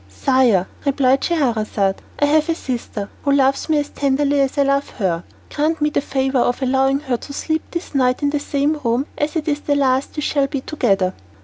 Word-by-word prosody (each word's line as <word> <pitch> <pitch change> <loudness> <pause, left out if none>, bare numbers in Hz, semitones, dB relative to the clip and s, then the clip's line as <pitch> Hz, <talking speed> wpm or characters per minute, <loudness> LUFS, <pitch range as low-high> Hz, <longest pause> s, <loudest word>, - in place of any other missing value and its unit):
"Sire," 220 - +2 0.2
replied 270 -1 +2
Scheherazade, 220 - 0 0.2
"I 290 - +3
have 305 +2 +2
a 330 - +2
sister 235 -7 -4
who 280 - +1
loves 275 +2 +2
me 310 - +3
as 290 0 -1
tenderly 280 +1 +1
as 270 +1 -1
I 285 - +4
love 275 0 +1
her. 180 -6 -1 0.3
Grant 310 +2 0
me 300 0 +1
the - - +1
favour 265 -1 0
of 245 +2 0
allowing 270 +1 +2
her 260 -5 -1
to 280 - -10
sleep 315 +2 -1
this 340 -2 -6
night 255 0 +1
in 285 - +2
the 295 - 0
same 290 +2 0
room, 240 +3 +1
as 295 +2 -2
it 320 -1 -2
is 295 -1 0
the 290 -1 0
last 265 -1 +1
we 300 - -3
shall 280 -2 +1
be 275 -1 -3
together." 195 -11 0
275 Hz, 210 wpm, -20 LUFS, 255-290 Hz, 0.3 s, I